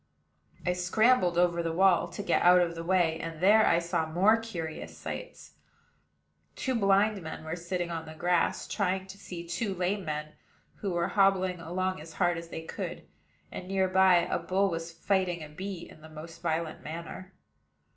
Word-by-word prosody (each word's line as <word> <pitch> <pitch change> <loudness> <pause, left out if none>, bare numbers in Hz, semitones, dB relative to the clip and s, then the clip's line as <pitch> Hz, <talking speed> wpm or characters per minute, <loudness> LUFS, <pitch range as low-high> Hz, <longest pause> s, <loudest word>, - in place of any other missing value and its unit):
I 180 - +2
scrambled 180 +1 +3
over 175 -1 +3
the 165 -1 -2
wall 185 -1 +4
to 175 +4 -7
get - - +2
out 180 +1 +7
of 175 -1 +1
the 165 0 -6
way, 170 -2 +2
and 165 -1 -6
there 210 +5 +5
I 170 - +4
saw 170 -1 -1
more 185 +7 +4
curious 175 -9 -6
sights. - - -8 1.0
Two 260 - -2
blind 200 -1 +3
men 160 -1 -7
were 160 +2 -3
sitting 175 0 -3
on 165 -1 -5
the 155 - -9
grass, 175 +1 +1
trying 190 +1 -1
to 190 +1 -11
see 170 -3 -8
two 190 +4 -2
lame 185 +3 -1
men 150 -1 -4 0.4
who 200 - -3
were 175 -1 0
hobbling 190 -2 +2
along 185 +2 -2
as 160 +1 -11
hard 175 -1 +1
as 165 0 -10
they 160 - -6
could; - - -6 0.5
and, 180 - -7
near 190 0 +1
by, 190 0 +5
a - - -1
bull 195 +1 +1
was 165 0 -4
fighting 175 0 0
a 150 - -9
bee 180 +2 -6
in 155 - -16
the 160 - -12
most 155 +1 -10
violent 165 -1 -2
manner. 170 +4 -7
175 Hz, 185 wpm, -29 LUFS, 165-190 Hz, 1.0 s, out